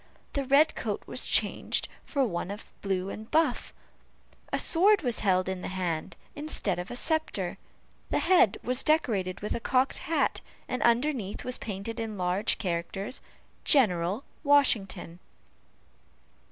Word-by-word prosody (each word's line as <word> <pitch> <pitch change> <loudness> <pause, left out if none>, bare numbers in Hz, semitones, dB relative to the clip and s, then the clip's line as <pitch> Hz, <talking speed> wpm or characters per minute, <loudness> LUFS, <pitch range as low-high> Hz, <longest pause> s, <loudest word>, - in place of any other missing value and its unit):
The 280 -1 -1
red 280 +4 +5
coat - - -3
was - - 0
changed - - +1 0.2
for 280 -3 0
one 175 -4 -3
of 205 +2 -7 0.2
blue 190 -1 -1
and 220 +1 -8
buff, 320 +1 +1 0.8
a - - +1
sword 385 +2 +4
was 245 -3 0
held 185 -2 +2
in 190 -1 -3
the - - -4
hand 180 -4 -3 0.2
instead 290 - -1
of 180 - -5
a - - -6
sceptre, 315 +4 -1 0.5
the - - +1
head 360 - +4
was 250 +1 +3
decorated 215 - +1
with 210 - -2
a - - -2
cocked 255 +3 +1
hat, 315 -1 0 0.3
and 255 - -3
underneath 235 -3 +1
was 250 0 -1
painted 210 +2 -5
in 220 -2 -4
large 185 +3 +1
characters, 185 +5 -3 0.4
"GENERAL 200 - +3 0.2
WASHINGTON." 210 - +2
220 Hz, 140 wpm, -28 LUFS, 185-280 Hz, 0.8 s, red